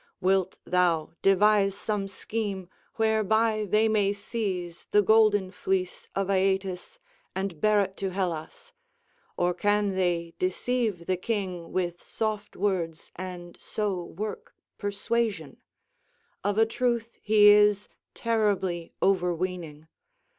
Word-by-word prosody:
Wilt 190 0 +1
thou 175 -4 +1
devise 195 0 +4
some 205 -1 -2
scheme 195 -1 -4 0.3
whereby 220 0 +2
they 215 +3 +4
may 205 -2 +2
seize 195 -5 -4
the 210 - +4
golden 205 -2 +4
fleece 185 0 -2
of 195 -1 0
Aeetes 190 - 0 0.4
and 190 -4 -3
bear 210 -1 +4
it 195 -1 -3
to 195 - -2
Hellas, 185 - -4 0.6
or 180 0 +2
can 205 +2 +1
they 175 -3 0
deceive 200 0 -1
the 185 +1 0
king 185 -5 -3
with 175 -2 -2
soft 215 -2 -3
words 180 -5 -2
and 180 -1 -7
so 200 -4 -2
work 205 +5 -6 0.2
persuasion? 220 +2 -2 0.9
Of 205 0 0
a 225 - +6
truth 235 0 -1
he 210 -1 +6
is 205 -1 +5 0.3
terribly 200 -7 0
overweening. 175 -4 -1
195 Hz, 115 wpm, -27 LUFS, 180-215 Hz, 0.9 s, a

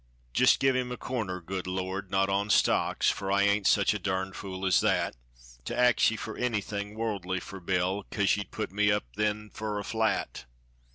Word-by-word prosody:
Jist - - +5
give 135 -1 +3
him 125 -1 -1
a 125 - -4
corner, 110 -8 -3
good 90 +2 -5
Lord 95 +1 -3
not 95 0 +2
on 100 +1 0
stocks, - - +3
Fur 95 -1 -4
I 100 0 +3
ain't 100 0 +2
such - - +4
a - - -3
durned 95 0 -2
fool 95 -1 -5
as 90 - +4
that. - - +1 0.5
To - - -4
ax 125 -1 +5
ye 115 - -3
fur 110 0 -6
anything 105 -3 -2
worldly 100 -5 -2
fur 95 +1 -9
Bill, 95 +2 -1
Kase 100 -2 +2
ye'd 105 - -5
put 110 - -4
me 105 +1 +2
up 105 0 +1
then 105 0 -1
fur 105 -1 -4
a 100 - -3
flat. 110 - -1
100 Hz, 195 wpm, -29 LUFS, 95-110 Hz, 0.5 s, Jist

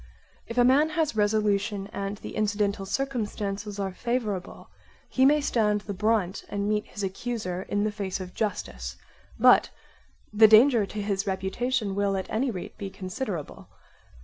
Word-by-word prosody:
If 230 - -7
a 245 - +6
man 275 +5 +5
has 315 -7 +1
resolution 205 -1 +1
and 200 +1 -3
the - - -8
incidental 205 -2 0
circumstances 210 -5 -3
are 195 -2 -2
favourable, 215 -4 -3 0.4
he 260 +1 +4
may 300 +1 +4
stand 210 -6 +1
the 205 0 -5
brunt 205 -2 0
and 200 0 -2
meet 210 0 0
his 205 - -7
accuser 190 -2 -3
in 205 0 +1
the 215 - 0
face 200 -3 -4
of 185 -1 -7
justice; 60 - -3 0.4
but - - +6 0.6
the 220 +1 +8
danger 220 0 +6
to 210 0 -5
his 200 0 -1
reputation 200 +4 -1
will 200 0 0
at 190 - -5
any 250 +5 +1
rate 185 -6 -7
be 200 - -4
considerable. 185 - -6
205 Hz, 155 wpm, -27 LUFS, 195-225 Hz, 0.6 s, the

